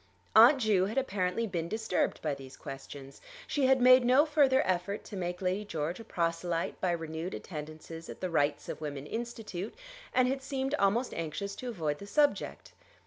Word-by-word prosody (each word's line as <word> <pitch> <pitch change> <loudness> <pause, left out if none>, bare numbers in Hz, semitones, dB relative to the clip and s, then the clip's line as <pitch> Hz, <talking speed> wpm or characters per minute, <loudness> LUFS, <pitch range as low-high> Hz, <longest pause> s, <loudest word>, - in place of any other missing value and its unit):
Aunt 235 +6 +9
Ju 215 -7 +3
had 215 +6 -4
apparently 205 -4 0
been 170 -5 -3
disturbed 220 -3 -1
by 150 -2 0
these 135 -1 -10
questions. 135 0 -9 0.2
She 280 -3 +1
had 265 0 +5
made 255 0 +7
no 255 +5 +5
further 280 -4 +3
effort 185 +3 -1
to 210 - -9
make 180 0 -3
Lady 185 +3 0
George 165 -2 -3
a - - -8
proselyte 170 -3 -2
by 185 - +1
renewed 165 +1 -3
attendances 155 0 -8
at - - -8
the 185 -2 -3
Rights 145 -2 +1
of - - -6
Women 145 -2 -5
Institute, 225 -2 -5 0.4
and 255 0 +3
had 270 +1 -1
seemed 270 0 -2
almost 220 +6 +2
anxious 165 +5 -4
to 250 - -5
avoid 155 -9 -2
the 200 - -9
subject. 290 +6 +1
190 Hz, 180 wpm, -31 LUFS, 165-245 Hz, 0.4 s, Aunt